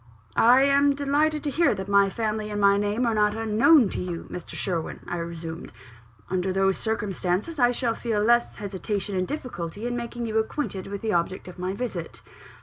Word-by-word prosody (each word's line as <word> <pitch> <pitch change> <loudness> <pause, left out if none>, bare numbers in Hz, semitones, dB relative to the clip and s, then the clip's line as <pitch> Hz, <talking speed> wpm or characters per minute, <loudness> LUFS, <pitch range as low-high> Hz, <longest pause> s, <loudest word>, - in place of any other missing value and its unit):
"I 250 +3 +6
am 280 0 +4
delighted 290 +2 +1
to 290 - -1
hear 330 -6 +3
that 190 0 -5
my 200 0 +4
family 215 0 -2
and 205 0 -3
my 200 0 +5
name 205 +4 0
are 230 - +1
not 210 -1 +2
unknown 225 +5 +5
to - - -4
you, 175 -2 -5
Mr. 180 - -7
Sherwin," 170 -4 -3
I 175 - -4
resumed. 170 -1 -6 0.6
"Under 185 +1 -1
those 195 0 +1
circumstances, 210 - -2
I 245 -1 +5
shall 245 -1 0
feel 225 -2 -2
less 235 +3 +3
hesitation 200 0 -3
and 185 0 0
difficulty 205 - -5
in 245 0 -2
making 240 0 -4
you 220 -1 +1
acquainted 220 -4 -3
with 200 0 -5
the 220 -2 0
object 170 +3 -1
of 180 0 -10
my 185 +1 -2
visit." 200 -8 -5
210 Hz, 190 wpm, -25 LUFS, 190-240 Hz, 0.6 s, I